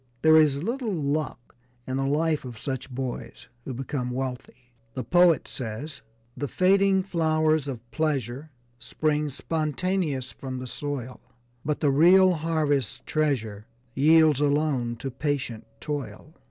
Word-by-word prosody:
There 160 0 +7
is 150 -2 +4
little 235 +2 -2
'luck' 150 -6 -3 0.3
in 130 0 -3
the 135 0 0
life 155 +2 +1
of 125 -3 -8
such 130 +3 -4
boys 130 -1 -6 0.2
who 135 - -4
become 130 0 -3
wealthy. 125 -1 -6 0.2
The 130 - -3
poet 175 +2 +4
says: 130 +5 -6 0.3
"The 145 - -3
fading 190 +4 +3
flowers 155 -4 +1
of 125 -5 -5
pleasures 140 -3 -2 0.3
Spring 150 +1 -1
spontaneous 155 +1 -2
from 130 -1 -6
the 125 - -5
soil, 130 -1 -5 0.4
But 150 0 -2
the 145 - +3
real 180 +6 +6
harvest's 150 - 0
treasure 115 -9 -1 0.3
Yields 155 +1 +5
alone 145 -5 +1
to 135 +3 -5
patient 130 -4 -3
toil." 150 +1 -6
145 Hz, 130 wpm, -26 LUFS, 130-160 Hz, 0.4 s, There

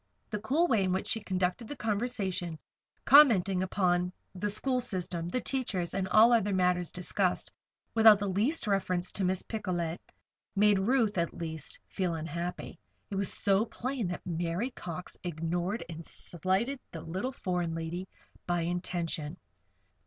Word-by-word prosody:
The 210 - -2
cool 275 +11 +2
way 220 - +3
in 185 - +1
which 190 - -1
she 225 - +2
conducted 185 +4 -1
the 290 - -5
conversation, 200 - -2 0.5
commenting 205 -10 +6
upon 180 -1 +1 0.2
the 195 +3 -2
school 255 +5 +1
system, 180 -7 -4
the 255 - -1
teachers, 205 -10 -1
and 190 -1 -1
all 220 +5 +6
other 205 -4 +2
matters 180 -1 +2
discussed, 180 +1 0 0.4
without 220 -2 +8
the 200 0 -2
least 220 - +1
reference 185 -3 0
to 200 - -2
Miss 185 0 +1
Picolet, 175 -6 -3 0.6
made 205 0 +4
Ruth, 215 -2 +2
at 170 - -1
least, 160 -3 -5
feel 180 -4 -1
unhappy. 170 +3 -5 0.3
It - - -2
was 195 0 +3
so 195 +1 +3
plain 240 0 -3
that 180 - -5
Mary 175 +7 -2
Cox 180 -3 -7
ignored 175 +5 -2
and 165 0 -7
slighted 190 - -1
the 165 - -7
little 185 +10 -3
foreign 180 -8 -2
lady 165 +3 -4 0.4
by 175 -1 +1
intention. 170 -2 -2
185 Hz, 150 wpm, -30 LUFS, 175-215 Hz, 0.6 s, without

